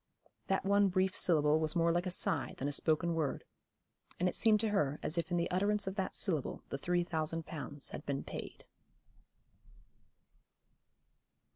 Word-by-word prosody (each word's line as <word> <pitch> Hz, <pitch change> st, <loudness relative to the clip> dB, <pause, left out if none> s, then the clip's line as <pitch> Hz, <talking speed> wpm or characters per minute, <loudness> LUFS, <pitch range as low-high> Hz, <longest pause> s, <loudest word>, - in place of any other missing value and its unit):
That 190 Hz, 0 st, 0 dB
one 200 Hz, 0 st, +4 dB
brief 185 Hz, 0 st, +1 dB
syllable 155 Hz, -2 st, +3 dB
was 155 Hz, +1 st, +2 dB
more 170 Hz, 0 st, +3 dB
like 175 Hz, +2 st, 0 dB
a -, -, 0 dB
sigh 160 Hz, -5 st, 0 dB
than 135 Hz, -, -2 dB
a -, -, -1 dB
spoken 160 Hz, +3 st, +2 dB
word, 160 Hz, -4 st, -2 dB, 0.8 s
and 180 Hz, -, +2 dB
it -, -, -1 dB
seemed 220 Hz, -2 st, +4 dB
to 220 Hz, -, 0 dB
her 150 Hz, -8 st, 0 dB
as 155 Hz, -, -1 dB
if 170 Hz, 0 st, -1 dB
in 175 Hz, -, 0 dB
the 170 Hz, +1 st, -1 dB
utterance 205 Hz, +3 st, +1 dB
of 190 Hz, -, -3 dB
that 190 Hz, -2 st, -3 dB
syllable 160 Hz, -9 st, -1 dB
the 140 Hz, -, -3 dB
three 175 Hz, +3 st, +1 dB
thousand 160 Hz, -1 st, -2 dB
pounds 145 Hz, -2 st, -6 dB
had -, -, -7 dB
been 140 Hz, -1 st, -3 dB
paid. -, -, -8 dB
170 Hz, 170 wpm, -33 LUFS, 155-190 Hz, 0.8 s, one